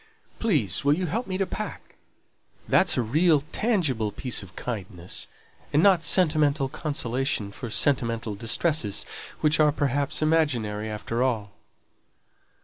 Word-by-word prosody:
Please 150 - +1
will 145 +1 +4
you 185 +2 -2
help 225 +10 -2
me 185 -1 -2
to 195 - +1
pack? - - -7 0.7
That's - - +4
a 125 - +2
real, 155 +6 +3
tangible 155 - 0
piece 125 0 -2
of 95 -3 -13
kindness, 95 -7 -5 0.4
and 150 +4 +3
not 190 -4 +5
sentimental 155 -5 +3
consolation 135 -7 -2
for 120 +3 -7
sentimental 115 -3 +1
distresses, 115 - 0 0.4
which 155 0 +3
are, 150 -1 +5
perhaps, 145 0 0
imaginary 120 -10 +1
after 110 +2 -3
all." 110 -6 0
135 Hz, 130 wpm, -26 LUFS, 110-155 Hz, 0.7 s, not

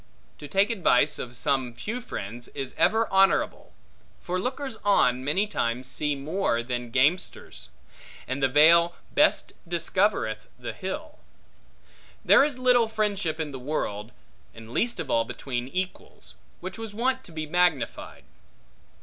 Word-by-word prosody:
To 145 - -8
take 195 +9 +2
advice 180 - +2
of 125 -1 -6
some 130 -2 0
few 220 - -4
friends, 120 - -6
is 135 -2 -4
ever 225 +1 +3
honorable; 195 0 +2 0.5
for 180 +1 -3
lookers 260 +3 -4
on 130 -11 +3
many 155 +9 +1
times 125 - -2
see 145 +3 -1
more 140 -4 -1
than 120 0 -4
gamesters; 140 +9 0 0.6
and 130 +2 -3
the 135 - +4
vale 170 +5 +5 0.2
best 300 +2 +3
discovereth 170 - 0
the 125 - -6
hill. 300 +11 -6 1.1
There - - +7
is 285 -3 -1
little 250 -2 +4
friendship 205 -7 -1
in 155 -2 -3
the 135 - -7
world, 115 -6 -3 0.4
and 115 0 -11
least 235 - 0
of 140 - -4
all 115 - +3
between 125 0 -5
equals, 180 - -6 0.3
which 185 +5 -7
was 220 -2 -7
wont 260 +3 0
to - - -10
be 155 -1 -4
magnified. 175 -3 0
160 Hz, 140 wpm, -26 LUFS, 125-205 Hz, 1.1 s, There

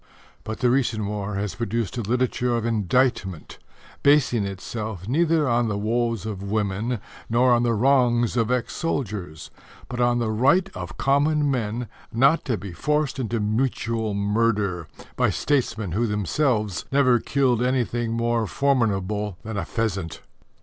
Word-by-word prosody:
But 110 +2 -6
the 125 -1 +4
recent 120 -5 +1
war 105 0 -3
has 100 -2 -2
produced 115 -2 -2
a 120 - -2
literature 125 +2 0
of 115 - -2
indictment, 110 - 0 0.4
basing 140 -7 +3
itself 100 0 -5
neither 160 +3 +2
on 120 -1 +2
the 105 -2 -1
woes 115 +1 -1
of 105 -4 -5
women 105 +3 -1 0.3
nor 120 +2 +4
on 120 - +3
the 120 -1 +1
wrongs 120 -1 +3
of 115 -2 +1
ex 125 -1 -1
soldiers, 105 - -4 0.4
but 125 0 -3
on 120 0 +3
the 115 -2 0
right 140 - +3
of - - -7
common 145 +1 +2
men 120 -1 -2 0.2
not 135 +8 +3
to 120 -6 0
be 95 0 -7
forced 150 - -1
into 115 -2 -1
mutual 110 -1 -1
murder 100 -4 0 0.3
by - - +2
statesmen 110 - -1
who 115 +7 0
themselves 105 - 0
never 130 -3 +4
killed 130 -2 +1
anything 120 -2 0
more 115 -1 0
formidable 105 -7 0
than 110 0 -5
a 100 -4 -2
pheasant. 100 -7 -3
115 Hz, 150 wpm, -24 LUFS, 105-125 Hz, 0.4 s, the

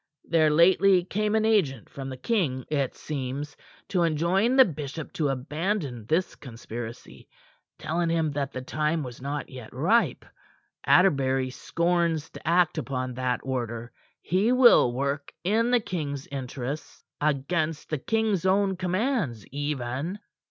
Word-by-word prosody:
There 160 -2 +3
lately 180 +4 +5
came 210 +4 -1
an 220 0 +2
agent 165 - +1
from 135 -1 -7
the 130 - -6
king, 130 - -1
it 140 -4 0
seems, 140 0 -5 0.3
to 180 - +1
enjoin 170 - +2
the 265 -1 +8
bishop 155 - -6
to 150 -3 0
abandon 145 - -2
this 170 +6 +1
conspiracy, 120 -2 -9 0.5
telling 170 +1 -1
him 165 -2 +1
that 140 -1 -2
the 130 - -6
time 155 +3 -1
was 125 -1 -8
not 140 +1 -4
yet 125 -4 -10
ripe. 190 - +1 0.6
Atterbury 135 -7 +3
scorns 170 +1 0
to - - -11
act 170 -1 +3
upon 130 -3 -3
that 125 0 -1
order. 120 -3 -4 0.3
He 195 +7 +2
will 250 - +6
work 140 +3 -2
in 220 +6 +2
the 245 0 +4
king's 145 -9 -4
interests 135 +1 -5 0.2
against 155 +2 -1
the 155 - -1
king's 220 +1 0
own 190 0 +2
commands 185 - -1
even." 145 +4 -3
155 Hz, 140 wpm, -26 LUFS, 130-185 Hz, 0.6 s, the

